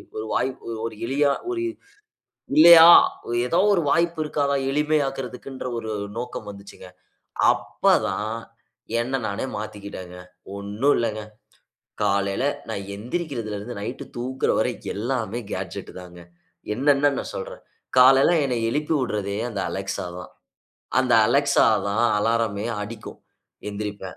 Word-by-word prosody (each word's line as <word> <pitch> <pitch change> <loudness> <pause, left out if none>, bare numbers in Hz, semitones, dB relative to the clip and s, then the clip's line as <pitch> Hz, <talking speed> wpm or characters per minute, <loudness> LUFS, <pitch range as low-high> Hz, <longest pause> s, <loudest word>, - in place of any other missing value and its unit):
ஒரு 110 - -4
வாய்ப்பு 130 -2 -2
ஒரு 115 - -5
எளிய 140 +4 +1 0.3
ஒரு 350 -1 -2 1.0
இல்லையா! 165 +1 +10 0.4
ஒரு 120 - -2
எதோ 170 +7 +2
ஒரு 170 - +1
வாய்ப்பு 170 0 +1
இருக்காதா? 140 -2 0
எளிமையாக்குன்றதுன்ற 135 -3 -2
ஒரு 110 -1 -5 0.3
நோக்கம் 125 -3 -6
வந்துச்சுங்க. 100 -2 -12 0.7
அப்ப - - +1
தான் 110 +2 -3 0.7
என்ன 130 +3 -2
நானே 100 +5 -3
மாத்திக்கிட்டேங்க. 100 -4 -8 0.4
ஒண்ணும் 105 +8 +1
இல்லங்க, 110 -2 -2 0.8
காலையில 100 +3 0 0.3
நான் 100 -3 -4
எந்திரிக்கிறதுலருந்து, 115 -4 -5
நைட் 120 +5 -5
தூங்குற 130 +2 -1
வரை - - +1 0.2
எல்லாமே 115 +1 -2
கேட்ஜெட் - - -6
தாங்க. 90 -1 -12 0.5
என்னென்ன 140 +2 +3
நான் - - -5
சொல்றேன். - - -7 0.4
காலையில 135 +5 +7
என்ன 125 -2 -1
எழுப்பி 150 +4 -1
விட்றதே 105 -5 -2
அந்த 100 -4 -4
Alexa 95 -1 -4
தான். - - -10 0.7
அந்த - - 0 0.2
Alexa - - +3 0.2
தான் 115 +4 +2
அலாரமே 115 -1 0 0.2
அடிக்கும் 110 +1 -9 0.5
எந்திரிப்பேன். 100 -2 -6
115 Hz, 115 wpm, -23 LUFS, 105-135 Hz, 1.0 s, இல்லையா